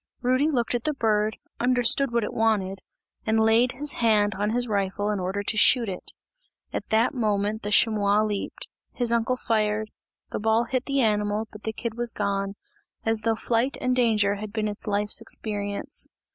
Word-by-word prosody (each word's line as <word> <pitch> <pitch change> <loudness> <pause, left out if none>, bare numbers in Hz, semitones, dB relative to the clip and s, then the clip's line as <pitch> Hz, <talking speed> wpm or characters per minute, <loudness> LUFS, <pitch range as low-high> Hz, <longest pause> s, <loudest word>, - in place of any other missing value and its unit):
Rudy 255 +5 +2
looked 245 -6 +1
at 240 -1 -2
the 305 -1 0
bird, 215 -3 +1 0.2
understood 250 +2 +3
what 235 -1 +1
it - - -4
wanted, 200 -4 0 0.4
and 220 0 +1
laid 225 +3 +3
his 285 +3 -1
hand 210 -3 +3
on 205 +2 -1
his 245 +2 0
rifle 205 0 -1
in 205 - -2
order 190 +3 -2
to 215 - 0
shoot 235 +2 +5
it. 185 -2 -6 0.6
At - - -4
that 225 +2 +2
moment 215 -2 0
the 205 - -4
chamois 210 -1 +3
leaped 210 -2 -3 0.3
his 240 -2 0
uncle 235 +2 +1
fired 215 -2 -1 0.4
the - - -3
ball 220 +2 +2
hit 255 +1 -2
the 275 -1 +1
animal, 210 -1 0
but 210 - -12
the 220 - -1
kid 225 +1 -5
was 240 -1 +3
gone, 200 -1 -2 0.5
as 225 -1 +2
though 225 0 +1
flight 235 +4 0
and 255 0 0
danger 215 -5 +2
had 210 0 -7
been 215 -1 -1
its 210 +1 -2
life's 205 0 +2
experience. 205 -2 -2
220 Hz, 185 wpm, -25 LUFS, 205-235 Hz, 0.6 s, shoot